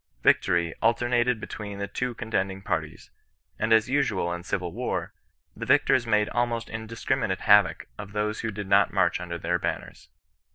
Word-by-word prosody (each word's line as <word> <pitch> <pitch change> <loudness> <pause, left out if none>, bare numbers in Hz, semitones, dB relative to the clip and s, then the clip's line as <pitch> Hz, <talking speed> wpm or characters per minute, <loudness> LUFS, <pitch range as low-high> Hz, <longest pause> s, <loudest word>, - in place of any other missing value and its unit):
Victory 85 -1 +3
alternated 120 +1 +2
be - - -6
tween 100 -2 -7
the 100 0 -3
two 125 +4 -3
contending 95 -4 -2
parties, 75 -4 -4 0.5
and 110 - 0
as 110 +1 +5
usual 110 -10 0
in 85 - -5
civil 90 -1 -3
war, - - -3 0.4
the - - -6
victors 120 -2 +3
made 105 -1 +3
almost 120 -1 -1
indiscriminate 110 +1 -2
havoc - - +4
of 100 -1 -7
those 105 0 -1
who 115 - -2
did 105 -1 -5
not 100 0 +4
march - - +1
under 85 -1 -5
their 90 +1 -1
banners. - - -5
105 Hz, 165 wpm, -26 LUFS, 95-115 Hz, 0.5 s, as